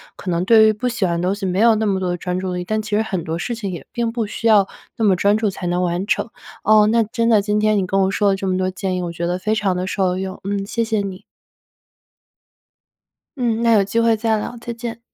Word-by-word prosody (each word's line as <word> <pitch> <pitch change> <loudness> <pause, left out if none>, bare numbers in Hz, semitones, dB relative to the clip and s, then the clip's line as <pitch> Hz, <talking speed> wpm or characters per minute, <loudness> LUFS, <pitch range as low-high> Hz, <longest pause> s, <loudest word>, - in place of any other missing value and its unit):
可 185 - -7
能 170 +1 0
对 220 +2 +6
于 215 - +3
不 250 +4 -2
喜 235 -5 -1
欢 170 -1 -1
的 180 - 0
东 195 - +1
西 205 -1 -5
没 185 0 -1
有 225 0 +5
那 220 0 0
么 195 -2 +1
多 185 -1 -2
的 175 - -1
专 180 +1 -3
注 185 0 -3
力， 180 0 -4
但 215 +3 -1
其 210 -1 -2
实 - - +2
很 190 -6 -3
多 160 0 -3
事 215 +8 -3
情 205 -4 -4
也 170 -6 -7
并 235 -1 -1
不 230 -1 -2
需 230 +2 -3
要 205 -3 +5 0.3
那 225 - +1
么 195 -3 +4
专 200 +3 +2
注 220 -1 0
才 185 -1 -6
能 175 +1 0
完 175 +2 -1
成。 - - 0 0.4
哦， 215 -1 +5
那 230 +1 +3
真 230 +2 -1
的 215 -3 +5
今 210 0 0
天 215 0 +2
你 195 - +1
跟 195 +1 +1
我 190 - +2
说 205 0 +2
了 195 - +2
这 195 0 -4
么 185 0 0
多 185 0 0
建 185 0 -3
议， 180 - -2
我 170 - -3
觉 170 +1 -3
得 175 +1 -1
非 215 +4 -1
常 200 -4 0
地 180 +1 -2
受 185 -1 0
用。 190 0 -5
嗯， 200 0 -2
谢 230 +3 -1
谢 220 -2 0
你。 195 -1 -6 2.2
嗯， 235 -2 0
那 230 - +4
有 205 -2 +5
机 205 +4 -1
会 230 -1 +3
再 220 0 0
聊。 215 - -5
再 240 - -5
见。 230 0 -6
200 Hz, 300 characters per minute, -20 LUFS, 185-220 Hz, 2.2 s, 对